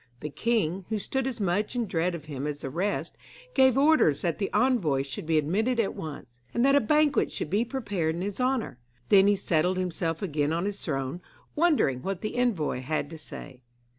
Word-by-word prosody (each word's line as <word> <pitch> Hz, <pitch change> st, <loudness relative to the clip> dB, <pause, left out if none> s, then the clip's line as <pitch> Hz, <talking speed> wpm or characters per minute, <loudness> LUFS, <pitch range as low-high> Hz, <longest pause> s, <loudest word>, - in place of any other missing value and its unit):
The 150 Hz, -, -5 dB
king, 195 Hz, -4 st, 0 dB
who 220 Hz, -, 0 dB
stood 265 Hz, +5 st, -2 dB
as 255 Hz, -4 st, -3 dB
much 205 Hz, +4 st, 0 dB
in 240 Hz, -1 st, 0 dB
dread 175 Hz, -2 st, -1 dB
of 155 Hz, -3 st, -9 dB
him 145 Hz, -2 st, -4 dB
as 150 Hz, -1 st, -4 dB
the 135 Hz, -, -5 dB
rest, 190 Hz, +7 st, -2 dB, 0.4 s
gave 260 Hz, -1 st, +5 dB
orders 275 Hz, -, +4 dB
that 170 Hz, -2 st, -1 dB
the 200 Hz, -, -2 dB
envoy 185 Hz, -, +2 dB
should 135 Hz, +3 st, -7 dB
be 160 Hz, -1 st, +3 dB
admitted 215 Hz, -, +1 dB
at 215 Hz, -, +1 dB
once, 125 Hz, -6 st, -9 dB
and 235 Hz, -, +3 dB
that 275 Hz, +1 st, +5 dB
a 285 Hz, -, +5 dB
banquet 300 Hz, +4 st, +2 dB
should 150 Hz, -, -4 dB
be 210 Hz, +4 st, +2 dB
prepared 205 Hz, -11 st, -2 dB
in 170 Hz, -, -4 dB
his 200 Hz, +4 st, -3 dB
honour. 250 Hz, -, -1 dB, 0.3 s
Then 195 Hz, -1 st, +6 dB
he 205 Hz, -, +4 dB
settled 180 Hz, -1 st, +1 dB
himself 170 Hz, -2 st, -2 dB
again 150 Hz, -4 st, 0 dB
on 170 Hz, +3 st, -1 dB
his 205 Hz, 0 st, -3 dB
throne, 135 Hz, +2 st, -3 dB, 0.3 s
wondering 295 Hz, -, +2 dB
what 190 Hz, +2 st, -3 dB
the 215 Hz, -, -4 dB
envoy 225 Hz, -, 0 dB
had 145 Hz, +3 st, -2 dB
to 160 Hz, -, -8 dB
say. 130 Hz, -4 st, -9 dB
185 Hz, 205 wpm, -27 LUFS, 155-235 Hz, 0.4 s, Then